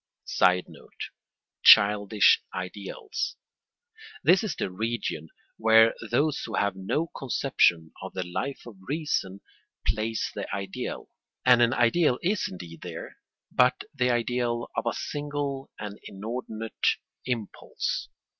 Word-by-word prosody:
[Sidenote: 90 0 0 0.5
Childish 105 0 +7
ideals.] 100 - -4 0.9
This 190 +4 +5
is 210 - -2
the 95 - -3
region 105 -6 -3 0.3
where 110 0 +6 0.2
those 145 +5 +1
who 115 - -4
have 100 0 +1
no 150 - -2
conception 115 - +2
of - - -7
the 95 - -1
Life 135 +10 -4
of 115 -5 -11
Reason 140 - -1 0.4
place 110 +1 -1
the - - -4
ideal; 95 -1 -5 0.4
and 125 -1 +7
an 120 +2 +4
ideal 125 +3 +3
is 200 +4 +1
indeed 85 -2 -9
there - - -8 0.3
but 125 0 +3
the 125 -3 +1
ideal 120 0 0
of - - -1
a 115 - +1
single 145 -2 -4
and 105 0 -7
inordinate 110 +2 -4 0.4
impulse. 115 -5 -3
115 Hz, 115 wpm, -27 LUFS, 100-135 Hz, 0.9 s, Childish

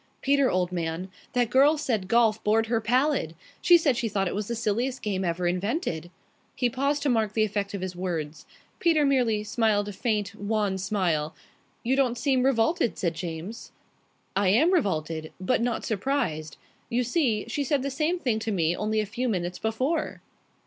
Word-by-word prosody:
"Peter, 280 -1 +3
old 180 0 0
man, 170 +1 -3 0.2
that 245 -2 +1
girl 285 +4 +5
said 230 -10 -1
golf 225 0 +3
bored 220 +2 +3
her 225 0 0
pallid. 250 - +1 0.3
She 350 - +7
said 295 -6 +2
she 230 -1 -1
thought 195 -2 0
it - - -2
was 205 0 -3
the 235 - -2
silliest 235 +4 -1
game 195 -3 -1
ever 175 0 -1
invented." 180 - -1 0.5
He 245 -2 +1
paused 280 +3 0
to 290 - +1
mark 220 -4 +1
the 220 - +2
effect 205 -1 -2
of 195 - -5
his 185 -1 -4
words. 165 -4 -4 0.3
Peter 320 -4 +3
merely 245 -6 +2
smiled 210 -1 +1
a - - -6
faint, 210 -1 -1
wan 205 -2 -1
smile. 175 -6 -1 0.5
"You 255 +3 +2
don't 255 -3 +1
seem 260 +1 +2
revolted," 255 +1 +2
said 170 -2 0
James. 170 +5 -6 0.6
"I 200 0 +2
am 280 - +4
revolted, 160 - -1
but 190 +6 +1
not 240 -1 -1
surprised. 205 - -2 0.3
You 245 +2 +1
see, 240 -5 +1
she 285 +4 -1
said 275 0 0
the 275 - -2
same 315 +6 0
thing 245 -10 0
to 220 0 -3
me 170 -3 +1
only 215 +2 0
a - - -2
few 240 +5 -2
minutes 180 -3 -2
before." 255 +9 -1
220 Hz, 185 wpm, -26 LUFS, 185-255 Hz, 0.6 s, She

